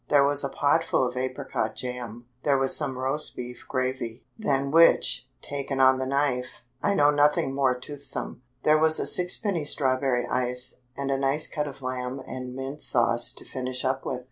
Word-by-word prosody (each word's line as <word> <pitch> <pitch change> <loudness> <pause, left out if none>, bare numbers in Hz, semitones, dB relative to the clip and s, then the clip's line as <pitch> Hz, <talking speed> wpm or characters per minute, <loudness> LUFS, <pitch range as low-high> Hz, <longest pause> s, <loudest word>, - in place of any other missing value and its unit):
There 145 -1 +5
was 145 0 +2
a 140 - -1
pot 145 +4 +1
full 130 - +1
of 125 - -7
apricot 130 0 -3
jam; 120 -2 -6 0.2
there 140 -2 +2
was 135 0 +3
some 135 -4 -1
roast 135 +4 +3
beef 125 0 -8
gravy, 130 -3 -3
than 140 -10 -1
which, 165 +2 +4
taken 140 -1 -4
on 130 0 +5
the 130 - -2
knife, 135 -2 -1 0.2
I 200 - +1
know 145 -2 +4
nothing 145 -2 +2
more 135 -2 +1
toothsome; 140 -2 -4 0.2
there 155 0 +4
was 155 0 +5
a - - -1
sixpenny 180 -1 +2
strawberry 130 -3 +1
ice, 125 0 -1 0.2
and 140 0 -2
a 135 - 0
nice 140 +3 0
cut 150 -1 -3
of 135 -1 -10
lamb 130 +1 -4
and 125 -1 -7
mint 135 +3 -6
sauce 120 -1 +3
to - - -9
finish 130 0 -4
up 130 +1 -1
with. 130 - -4
135 Hz, 185 wpm, -26 LUFS, 125-145 Hz, 0.2 s, There